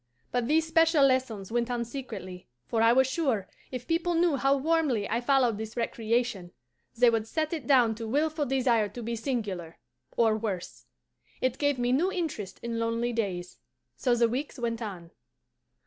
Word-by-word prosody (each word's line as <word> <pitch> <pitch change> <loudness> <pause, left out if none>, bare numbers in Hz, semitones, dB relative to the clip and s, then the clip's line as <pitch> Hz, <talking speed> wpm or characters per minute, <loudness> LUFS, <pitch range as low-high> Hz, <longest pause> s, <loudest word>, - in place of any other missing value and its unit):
But 245 -1 0
these 315 +3 +3
special 325 -2 +4
lessons 250 -7 0
went 240 0 0
on 240 -1 -1
secretly, 225 -8 -7 0.2
for 225 - 0
I 230 0 +6
was 265 +2 +5
sure, 260 - -1 0.2
if 250 -1 -6
people 335 +3 0
knew 335 -2 +3
how 275 +1 +2
warmly 290 -7 +1
I 230 +2 -1
followed 245 -4 +2
this 220 +2 -6
recreation, 230 -5 -1 0.4
they 245 0 +6
would 225 -1 -1
set 310 +5 -1
it 300 -7 -4
down 245 -5 +5
to 225 +1 -6
wilful 295 +4 0
desire 245 -5 +2
to 240 +4 -8
be 235 +1 -2
singular 210 - -3 0.4
or 225 -2 +4
worse. 205 -5 -5 0.5
It 255 -1 -1
gave 285 -2 +2
me 245 0 0
new 335 +9 +2
interest 320 - -4
in 230 -1 -3
lonely 230 +1 -1
days. 185 -6 -3 0.4
So 245 -2 +1
the 235 0 +4
weeks 265 +6 -4
went 235 -1 -2
on. 180 -6 -7
240 Hz, 175 wpm, -28 LUFS, 225-275 Hz, 0.5 s, I